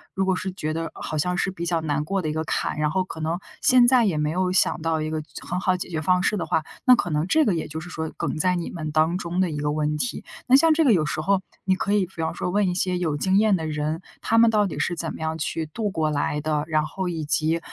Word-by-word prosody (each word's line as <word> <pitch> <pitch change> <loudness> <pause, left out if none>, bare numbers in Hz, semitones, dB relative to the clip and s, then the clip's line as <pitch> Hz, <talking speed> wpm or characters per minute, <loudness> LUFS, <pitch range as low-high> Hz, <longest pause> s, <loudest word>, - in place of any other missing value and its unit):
如 190 - +1
果 190 -1 +2
是 190 +1 -3
觉 155 -4 -3
得 165 +1 -3
好 - - -5
像 180 +4 0
是 190 - 0
比 170 -2 -7
较 170 -1 +1
难 150 -1 -1
过 195 +5 -1
的 - - -2
一 - - -2
个 160 +1 -1
坎， - - -2
然 150 0 +2
后 185 +5 0
可 180 - -9
能 160 +2 -2 0.2
现 250 -1 +6
在 250 -1 +5
也 180 -7 +1
没 150 0 0
有 180 +1 0
想 180 -2 +2
到 165 -1 0
一 155 - -2
个 155 0 -2 0.2
很 180 - -2
好 185 0 +1
解 180 - -6
决 160 -3 -3
方 180 +3 +2
式 210 +2 +1
的 - - -2
话， 160 - +1 0.2
那 255 - +8
可 180 - -2
能 150 +2 0
这 315 +9 +3
个 205 - +2
也 160 - -3
就 155 +2 -6
是 175 +2 -9
说 160 -2 -4
梗 - - -2
在 180 +3 +2
你 170 -1 -4
们 155 -3 -5
当 160 +3 +2
中 175 0 -3
的 185 -3 +2
一 150 - -4
个 145 0 0
问 150 0 -1
题， 245 - -2 0.2
那 255 - +6
像 320 +3 +6
这 320 +1 +3
个 270 - +5
有 155 -4 +2
时 150 - -2
候， 195 +3 +2 0.2
你 190 -1 +3
可 200 +2 -1
以 205 -2 +3
比 190 - -23
方 160 0 -1
说 175 - -3
问 200 +1 +2
一 180 - 0
些 180 0 0
有 165 -4 -1
经 190 +5 +2
验 215 -1 +4
的 160 -3 -3
人， 155 +2 -2 0.2
他 225 - +1
们 230 0 +6
到 210 -2 +3
底 195 - -4
是 175 - 0
怎 165 -1 -4
么 - - -9
样 160 0 -2
去 160 0 -2
度 210 +7 -3
过 155 -3 0
来 150 0 -1
的？ 150 -1 0
然 155 -1 +1
后 180 +4 -4
以 160 -3 -3
及 155 +3 +1
170 Hz, 320 characters per minute, -24 LUFS, 155-190 Hz, 0.2 s, 那